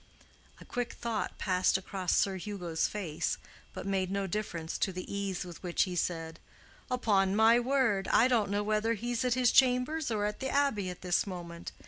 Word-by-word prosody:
A - - -12
quick 245 -1 -3
thought 230 -2 -3
passed 185 -1 +2
across 190 -1 -2
Sir 195 -1 +2
Hugo's 180 -4 -2
face, 180 -8 -2 0.3
but - - -7
made 190 -2 0
no 195 0 -1
difference 170 -4 -3
to 195 - +1
the 185 0 -6
ease 195 -2 -2
with 175 -2 -10
which 175 -2 +1
he 180 -2 -4
said, 165 -2 -2 0.5
"Upon 200 -6 +2
my 225 +2 +6
word, 245 -6 +1
I 240 - +5
don't 230 -6 +2
know 205 +1 0
whether 215 +2 +1
he's 240 +3 -2
at 250 -1 +2
his 250 -2 +3
chambers 260 +4 +3
or 210 -2 0
the 265 +5 -5
Abbey 260 -10 +1
at 180 - -8
this 180 +2 +1
moment. 170 -2 -7
200 Hz, 180 wpm, -31 LUFS, 185-235 Hz, 0.5 s, my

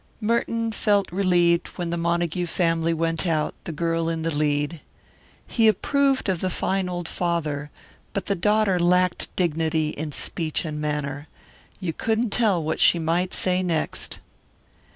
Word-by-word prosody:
Merton 230 0 0
felt 205 -4 +1
relieved 175 -2 +2
when 175 -2 -3
the - - 0
Montague 170 +1 0
family 165 -1 +1
went 165 +2 0
out, 155 -2 0
the - - -4
girl 165 +1 -1
in 165 -1 -2
the 165 -1 0
lead. 145 +1 0 0.6
He 225 -2 +2
approved 275 +5 +2
of 185 -3 0
the 185 - 0
fine 190 +1 -1
old 175 -2 -4
father, 155 -5 -2 0.4
but 200 - -3
the 200 - +1
daughter 205 0 +2
lacked 180 0 +2
dignity 160 -2 0
in 150 0 -5
speech 160 +3 0
and 150 -1 -4
manner. 145 -1 -3 0.5
You 180 -5 -3
couldn't 225 +5 0
tell 200 -8 +2
what 155 - -2
she - - +5
might 170 +3 0
say 185 0 +1
next. 170 -4 -2
170 Hz, 150 wpm, -24 LUFS, 160-190 Hz, 0.6 s, she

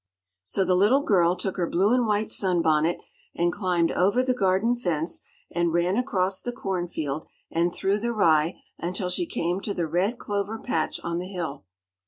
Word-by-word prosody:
So 190 - 0
the 185 - +2
little 210 +10 +4
girl 175 -6 +3
took 185 +1 -3
her 175 -2 0
blue 195 +6 +3
and 250 -2 +2
white 210 0 0
sun 180 -4 +2
bonnet, 160 +2 +2 0.4
and 175 0 +1
climbed 180 -4 +1
over 205 +8 +2
the 255 0 +1
garden 200 +2 +2
fence 170 -7 -1 0.3
and 170 0 +1
ran 175 +3 +1
across 195 -6 0
the 245 - -3
corn 190 -8 -3
field 155 -3 -4 0.2
and 170 +1 +1
through 195 +3 0
the 235 +2 -1
rye 165 -6 +2 0.2
until 180 +1 -2
she 350 - -1
came 175 - -1
to 205 - -3
the 170 - 0
red 180 +9 0
clover 205 +1 -3
patch 250 - -2
on 170 0 -2
the 180 - -5
hill. 165 - -5
185 Hz, 190 wpm, -26 LUFS, 170-205 Hz, 0.4 s, little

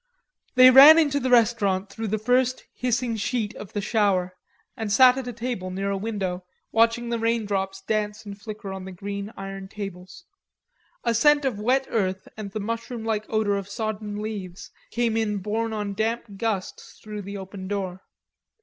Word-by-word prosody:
They 255 0 +9
ran 285 +5 +10
into 290 -3 +3
the 260 -1 -1
restaurant 210 -5 +3
through 225 +2 -4
the 215 +2 0
first 250 +3 +1
hissing 245 -1 -1
sheet 220 0 -2
of 205 - -10
the 205 - -1
shower 195 -4 +1 0.4
and 220 -4 -4
sat 250 +3 +7
at 265 -2 -5
a - - -3
table 235 -5 -4
near 195 +2 -2
a - - 0
window 190 -4 -3 0.3
watching 230 +1 +2
the 235 -1 -1
rain 230 -1 +1
drops 195 -1 -2
dance 210 +1 -2
and 200 -1 -7
flicker 210 -1 -7
on 190 -1 -7
the 190 - -7
green 200 +3 -6
iron 195 0 -7
tables. 195 - -8 0.8
A 235 - +1
scent 290 +5 +4
of 240 -6 -1
wet 255 +5 +2
earth 190 -3 -1
and 215 -2 -6
the 215 - -5
mushroom 230 +2 -4
like 215 -1 -2
odor 215 -2 +1
of 200 0 -6
sodden 210 -1 -4
leaves 195 -4 -6 0.2
came 235 -2 0
in 215 -2 0
borne 220 +3 -2
on 210 -2 -3
damp 225 +3 -1
gusts 200 -2 -4
through 210 -1 -6
the 200 +1 -7
open 190 0 -8
door. 190 -2 -3
215 Hz, 180 wpm, -25 LUFS, 195-230 Hz, 0.8 s, ran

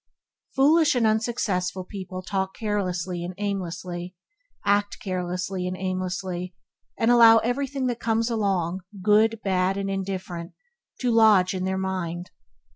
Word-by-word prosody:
Foolish 300 +2 +4
and 240 -2 +2
unsuccessful 215 -5 0
people 185 -1 -7
talk 190 0 -2
carelessly 185 -5 -2
and 180 +1 -6
aimlessly, 180 -2 -4 0.5
act 205 0 +1
carelessly 180 0 -3
and 185 0 -4
aimlessly, 185 -1 -3 0.4
and 225 +1 +3
allow 230 -2 +8
everything 265 +4 -1
that 245 -2 -1
comes 225 0 +1
along 190 -6 0 0.2
good, 215 +2 +4
bad, 190 0 +1
and 195 -1 -2
different 180 -3 -6 0.5
to 250 -2 +1
lodge 215 -5 +5
in 185 -1 -2
their 190 0 -1
mind. 185 -2 -3
190 Hz, 125 wpm, -25 LUFS, 180-220 Hz, 0.5 s, allow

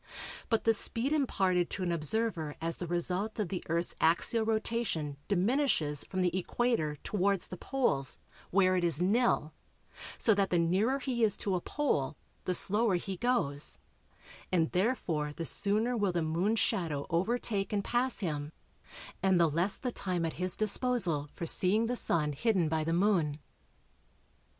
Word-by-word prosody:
But 225 -2 +1
the 225 - +4
speed 230 +6 +1
imparted 190 - +1
to 190 - -3
an 175 - -1
observer 170 -1 -1
as 165 0 -2
the 175 - -5
result 180 +5 -1
of 205 -5 -1
the 185 - -4
Earth's 170 +1 0
axial 170 +8 +3
rotation 220 -9 -2
diminishes 200 - +1
from 185 -1 -2
the 180 -1 0
equator 185 -5 0
towards 200 -2 0
the - - -8
poles 175 - 0 0.3
where 185 0 +3
it 180 - 0
is 165 -3 0
nil, 195 -4 +1 0.6
so 220 - +3
that 200 -1 +1
the 175 - +2
nearer 190 +10 +2
he 255 -3 -2
is 215 -3 +2
to 195 - -1
a 180 - 0
pole 155 - -1 0.3
the 180 - +1
slower 210 +1 +3
he 190 +2 -3
goes, 175 - -1 0.7
and 165 -3 +1
therefore 180 - -1
the 165 - -5
sooner 215 +8 +1
will 205 -4 +1
the 170 -2 -1
Moon's 180 +8 0
shadow 165 -9 -1
overtake 200 +3 -1
and 205 -2 0
pass 245 +1 0
him, 150 -5 -3 0.7
and 190 -1 +3
the 170 - +5
less 170 +6 +1
the 250 - -3
time 180 -6 -2
at 160 - -3
his 185 0 0
disposal 210 - +2
for 170 - -4
seeing 195 +7 +3
the 245 +2 -1
Sun 150 -9 +3
hidden 185 - +1
by 160 0 0
the 165 - -2
Moon. 170 -5 +1
185 Hz, 165 wpm, -31 LUFS, 165-225 Hz, 0.7 s, the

